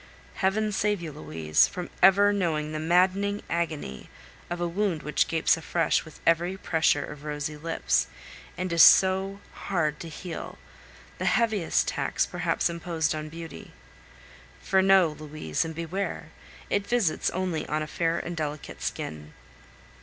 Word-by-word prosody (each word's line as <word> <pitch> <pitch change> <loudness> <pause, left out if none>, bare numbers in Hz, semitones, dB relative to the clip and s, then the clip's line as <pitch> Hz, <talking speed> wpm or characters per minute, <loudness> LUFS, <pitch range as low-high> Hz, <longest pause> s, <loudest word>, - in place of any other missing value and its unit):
Heaven 210 +3 +1
save 205 0 0
you, 165 -2 -6
Louise, 80 - +1
from 180 -1 -7
ever 200 +2 +6
knowing 160 -6 -1
the 155 - -3
maddening 185 +5 +2
agony 155 - -3 0.4
of 175 0 -3
a 175 - 0
wound 180 -2 -1
which 150 - +1
gapes 160 0 +2
afresh 165 0 0
with 155 - -13
every 175 +3 +2
pressure 160 -5 +1
of 150 -1 -10
rosy 150 0 -4
lips, 165 +2 0 0.5
and 185 -1 -2
is 165 - +5
so 190 +3 +6
hard 155 -6 -1
to 165 - -7
heal 165 +1 -7 0.6
the - - -2
heaviest 220 -7 +2
tax 140 -1 0
perhaps 175 -2 0
imposed 170 -2 -1
on 155 0 -5
beauty. 165 +1 -9 0.9
For 190 -1 +2
know, 190 -3 +5
Louise, 150 - -3
and 160 -1 -6
beware! 170 -1 -4 0.4
it 200 0 -1
visits 230 -10 +1
only 180 -3 -2
a 155 0 -1
fair 165 +2 -1
and 175 0 -4
delicate 150 -2 -5
skin. 75 0 -5
170 Hz, 145 wpm, -27 LUFS, 155-190 Hz, 0.9 s, ever